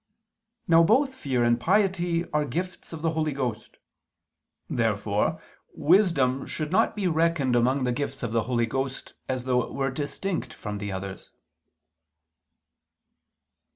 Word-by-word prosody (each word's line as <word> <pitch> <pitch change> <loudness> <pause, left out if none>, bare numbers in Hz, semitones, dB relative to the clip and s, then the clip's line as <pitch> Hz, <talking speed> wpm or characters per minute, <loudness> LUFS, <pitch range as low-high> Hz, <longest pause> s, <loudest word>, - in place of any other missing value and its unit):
Now 165 0 +6
both 260 - +3
fear 130 - -1
and 120 0 +3
piety 175 - +1
are 150 0 +2
gifts 175 +7 -5
of 165 -1 -7
the 165 - +2
Holy 155 -2 -1
Ghost. 120 -6 -4 0.9
Therefore - - 0 0.4
wisdom 150 -8 +3
should 155 -1 -3
not 215 +5 +3
be 200 -3 0
reckoned 160 -6 +2
among 130 +3 +2
the 125 - +1
gifts 135 +1 -3
of 115 - -2
the 115 0 +2
Holy 120 -1 +1
Ghost, 135 +3 -4 0.2
as 130 -1 -1
though 125 -1 +2
it - - -7
were 135 -1 0
distinct 155 +7 -3
from 105 -1 -5
the 100 -1 -4
others. 95 0 -6
140 Hz, 140 wpm, -26 LUFS, 125-170 Hz, 0.9 s, Now